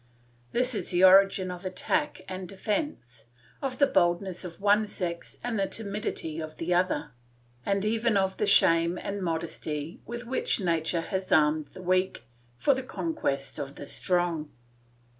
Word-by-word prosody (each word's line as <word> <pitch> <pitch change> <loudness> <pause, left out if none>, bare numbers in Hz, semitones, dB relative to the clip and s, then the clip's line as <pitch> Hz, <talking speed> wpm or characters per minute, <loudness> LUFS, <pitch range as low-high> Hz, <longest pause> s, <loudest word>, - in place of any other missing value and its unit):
This 250 +1 +1
is 215 - -3
the 180 0 +2
origin 190 0 +6
of 180 +1 -8
attack 195 +8 -1
and 185 -1 -6
defence, 195 - -3 0.4
of 265 -2 -3
the 280 - +6
boldness 175 -5 +1
of 175 -2 -8
one 205 +1 +3
sex 170 -4 -5
and 235 -3 -1
the 195 - +1
timidity 200 -7 -3
of 155 -1 -7
the 175 +2 -1
other, 175 -4 +1 0.6
and 200 0 +1
even 225 0 +2
of 190 -1 +1
the 210 - 0
shame 170 -2 +5
and 200 +2 -4
modesty 160 -2 -3
with 240 +1 -6
which 255 -1 0
nature 170 -2 0
has 190 +2 -4
armed 150 0 +4
the 185 - -10
weak 185 +1 +1 0.3
for 275 - +3
the 265 - -2
conquest 250 - -3
of 140 0 -5
the - - -8
strong. 175 -1 0
185 Hz, 160 wpm, -28 LUFS, 165-210 Hz, 0.6 s, origin